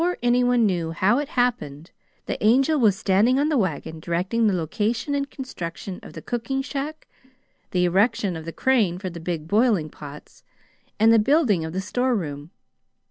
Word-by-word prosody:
Before 355 Hz, +1 st, 0 dB
anyone 245 Hz, -1 st, +3 dB
knew 170 Hz, -5 st, -1 dB
how 200 Hz, +9 st, +2 dB
it 290 Hz, -, -3 dB
happened, 200 Hz, -, -2 dB, 0.3 s
the -, -, -4 dB
Angel 270 Hz, +8 st, +4 dB
was 210 Hz, -6 st, +3 dB
standing 210 Hz, +8 st, +2 dB
on 290 Hz, +2 st, +2 dB
the 305 Hz, -, +1 dB
wagon, 160 Hz, -4 st, -3 dB
directing 185 Hz, +8 st, 0 dB
the 205 Hz, -, +2 dB
location 215 Hz, -, -2 dB
and 280 Hz, 0 st, -1 dB
construction 185 Hz, -7 st, -7 dB
of -, -, -12 dB
the -, -, -9 dB
cooking 250 Hz, +3 st, -2 dB
shack, 290 Hz, +3 st, -5 dB, 0.6 s
the 180 Hz, -1 st, +1 dB
erection 195 Hz, +1 st, +1 dB
of 160 Hz, -1 st, -7 dB
the 165 Hz, -, -5 dB
crane 215 Hz, -6 st, +1 dB
for 185 Hz, -1 st, -5 dB
the 170 Hz, -, -8 dB
big 165 Hz, -2 st, -4 dB
boiling 205 Hz, -, +2 dB
pots, 145 Hz, 0 st, -12 dB, 0.6 s
and 225 Hz, +1 st, +6 dB
the 225 Hz, -, +6 dB
building 235 Hz, -, +2 dB
of 160 Hz, -, -5 dB
the 190 Hz, +3 st, -3 dB
store 245 Hz, +6 st, 0 dB
room. 145 Hz, -6 st, -5 dB
210 Hz, 180 wpm, -23 LUFS, 170-250 Hz, 0.6 s, and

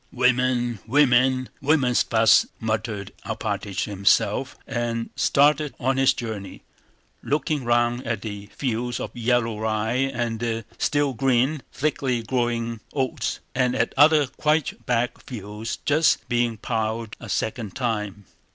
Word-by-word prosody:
"Women, 125 Hz, -2 st, +1 dB
women! 130 Hz, -1 st, +4 dB
Women's 135 Hz, -4 st, +3 dB
fuss!" 115 Hz, -1 st, +4 dB
muttered 110 Hz, -3 st, -3 dB
Alpátych 100 Hz, -2 st, -3 dB
to -, -, -5 dB
himself 100 Hz, +6 st, +2 dB
and 120 Hz, -2 st, -3 dB
started 145 Hz, +1 st, +3 dB
on 130 Hz, +1 st, +1 dB
his 135 Hz, -1 st, +4 dB
journey, 110 Hz, -4 st, -6 dB, 0.6 s
looking 150 Hz, -1 st, -1 dB
round 120 Hz, +1 st, +1 dB
at 110 Hz, -4 st, -2 dB
the 100 Hz, -2 st, -6 dB
fields 120 Hz, 0 st, -3 dB
of -, -, -6 dB
yellow 115 Hz, -2 st, 0 dB
rye 110 Hz, +2 st, 0 dB
and 120 Hz, -2 st, -2 dB
the 115 Hz, -1 st, -2 dB
still 145 Hz, -2 st, +1 dB
green, 130 Hz, +4 st, +1 dB
thickly 135 Hz, -5 st, -1 dB
growing 115 Hz, -1 st, -1 dB
oats, 130 Hz, -3 st, -2 dB
and 125 Hz, -1 st, +1 dB
at -, -, 0 dB
other 150 Hz, +1 st, +6 dB
quite 150 Hz, +3 st, -1 dB
black 120 Hz, 0 st, 0 dB
fields 105 Hz, -2 st, -6 dB
just 155 Hz, +2 st, +3 dB
being 120 Hz, -1 st, 0 dB
plowed 110 Hz, 0 st, -2 dB
a 115 Hz, -, -9 dB
second 110 Hz, 0 st, -2 dB
time. 105 Hz, -5 st, -3 dB
120 Hz, 130 wpm, -24 LUFS, 110-130 Hz, 0.6 s, other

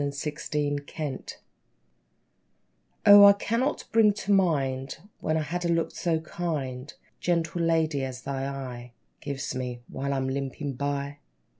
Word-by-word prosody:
=The 145 Hz, +1 st, -4 dB
Lame 145 Hz, -1 st, +1 dB, 0.2 s
House= 145 Hz, -5 st, -4 dB, 1.7 s
O, 205 Hz, 0 st, +10 dB
I 200 Hz, 0 st, +10 dB
cannot 230 Hz, +7 st, -1 dB
bring 220 Hz, -2 st, +5 dB
to 205 Hz, 0 st, -3 dB
mind 135 Hz, -8 st, +1 dB, 0.2 s
When 155 Hz, 0 st, 0 dB
I've 155 Hz, -, -1 dB
had 175 Hz, +4 st, -3 dB
a -, -, 0 dB
look 165 Hz, -1 st, +1 dB
so 165 Hz, -3 st, 0 dB
kind, 150 Hz, -5 st, -4 dB, 0.3 s
Gentle 170 Hz, -1 st, 0 dB
lady, 160 Hz, -4 st, +1 dB
as 130 Hz, -1 st, -5 dB
thine 135 Hz, -1 st, -3 dB
eye 125 Hz, -3 st, -6 dB, 0.3 s
Gives 140 Hz, -2 st, -4 dB
me, 125 Hz, -1 st, -4 dB
while 140 Hz, +1 st, -3 dB
I'm 130 Hz, -1 st, -1 dB
limping 135 Hz, +1 st, -3 dB
by! 140 Hz, +2 st, -3 dB
145 Hz, 140 wpm, -27 LUFS, 135-170 Hz, 1.7 s, O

